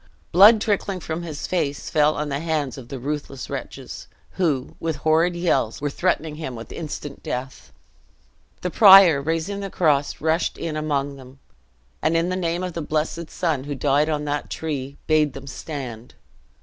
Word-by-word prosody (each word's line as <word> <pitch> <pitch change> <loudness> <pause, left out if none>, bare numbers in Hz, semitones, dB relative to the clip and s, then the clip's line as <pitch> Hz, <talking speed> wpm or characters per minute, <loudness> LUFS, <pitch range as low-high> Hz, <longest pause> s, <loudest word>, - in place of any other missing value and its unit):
Blood 205 +5 +8
trickling 200 -3 -1
from 160 0 -4
his 160 -4 -5
face 155 -3 -2
fell 150 0 +3
on 150 0 -3
the 140 0 -2
hands 155 -4 -1
of 130 -4 -10
the 135 - -6
ruthless 135 -1 -5
wretches, - - -7 0.2
who, 150 -8 -1
with 165 -1 -2
horrid 160 +4 +2
yells, 150 -10 0
were 145 0 -2
threatening 160 -2 -1
him 155 -6 -5
with 115 0 -9
instant 150 -2 -6
death. 130 +2 -6 0.9
The 180 - -2
prior, 190 -8 +8
raising 165 +6 -2
the 200 -1 -4
cross, 145 -6 +1
rushed 160 +2 0
in 160 -2 -4
among 145 -2 -1
them, 130 0 -14 0.6
and, 165 +1 +2
in 165 +2 +1
the 185 - -1
name 175 -1 -1
of 180 -1 -4
the 165 - -4
blessed 155 +2 -2
Son 155 -7 -1
who 145 0 -4
died 145 +3 +2
on 150 -1 -1
that 145 0 -2
tree, 140 -3 -4
bade 155 -3 +2
them 135 0 -9
stand! 130 -5 -7
155 Hz, 175 wpm, -23 LUFS, 140-170 Hz, 0.9 s, Blood